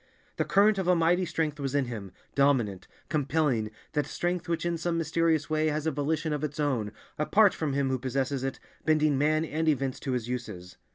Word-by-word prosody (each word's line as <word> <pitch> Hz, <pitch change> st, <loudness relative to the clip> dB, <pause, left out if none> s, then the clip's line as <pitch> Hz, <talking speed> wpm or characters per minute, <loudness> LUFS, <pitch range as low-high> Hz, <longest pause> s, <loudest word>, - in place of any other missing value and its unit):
The -, -, +1 dB
current 205 Hz, +1 st, +4 dB
of 185 Hz, -, -2 dB
a 180 Hz, -, +5 dB
mighty 175 Hz, +2 st, +3 dB
strength 155 Hz, -3 st, -2 dB
was 140 Hz, -1 st, -2 dB
in 140 Hz, -2 st, +2 dB
him, 105 Hz, -6 st, -6 dB, 0.2 s
dominant, 125 Hz, -9 st, +2 dB, 0.2 s
compelling, 140 Hz, -6 st, +1 dB, 0.2 s
that 150 Hz, -1 st, 0 dB
strength 175 Hz, -1 st, -2 dB
which 170 Hz, 0 st, -1 dB
in 170 Hz, -1 st, -1 dB
some 170 Hz, 0 st, -1 dB
mysterious 165 Hz, -1 st, +1 dB
way 155 Hz, 0 st, +1 dB
has 155 Hz, 0 st, -1 dB
a 160 Hz, -, +2 dB
volition 150 Hz, +2 st, -1 dB
of 150 Hz, 0 st, -3 dB
its 150 Hz, 0 st, -4 dB
own, 125 Hz, -8 st, 0 dB, 0.3 s
apart 200 Hz, +6 st, +4 dB
from 150 Hz, -4 st, -2 dB
him 140 Hz, -1 st, +1 dB
who 130 Hz, -1 st, 0 dB
possesses 130 Hz, +1 st, -1 dB
it, 135 Hz, 0 st, -3 dB, 0.2 s
bending 155 Hz, -2 st, +3 dB
men 155 Hz, +3 st, +2 dB
and 160 Hz, +1 st, -2 dB
events 135 Hz, -3 st, 0 dB
to 135 Hz, -, -3 dB
his 120 Hz, -2 st, -2 dB
uses. 110 Hz, -8 st, -6 dB
150 Hz, 205 wpm, -28 LUFS, 130-160 Hz, 0.3 s, a